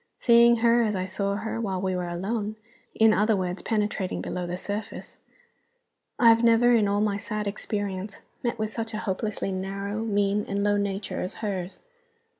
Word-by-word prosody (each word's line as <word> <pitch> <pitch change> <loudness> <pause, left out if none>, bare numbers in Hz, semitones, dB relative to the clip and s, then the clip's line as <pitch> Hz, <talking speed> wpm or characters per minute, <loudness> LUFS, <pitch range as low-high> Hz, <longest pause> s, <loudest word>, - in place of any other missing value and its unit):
Seeing 235 0 +6
her 235 +1 +5
as 215 -3 0
I 185 -1 -1
saw 200 +1 -2
her 220 +2 -3
while 190 -4 -2
we 185 0 -1
were 180 -1 -2
alone 205 +5 -3 0.4
in 220 -1 +5
other 215 +2 +3
words, 180 0 -3
penetrating 210 -4 -1
below 180 -1 -4
the 175 +1 -3
surface 205 +3 -6 1.0
I 235 - +6
have 230 +1 +5
never, 235 +1 +5
in 220 -3 +4
all 200 +1 +1
my 205 -1 +1
sad 215 0 -4
experience, 200 -1 -4 0.2
met 240 -1 -1
with 215 0 -2
such 225 -1 -4
a 215 - -4
hopelessly 200 0 -2
narrow, 195 +3 -3
mean, 205 -1 +1
and 200 0 -1
low 205 0 +2
nature 200 0 -2
as 185 - -4
hers. 190 -2 -4
205 Hz, 180 wpm, -26 LUFS, 195-220 Hz, 1.0 s, Seeing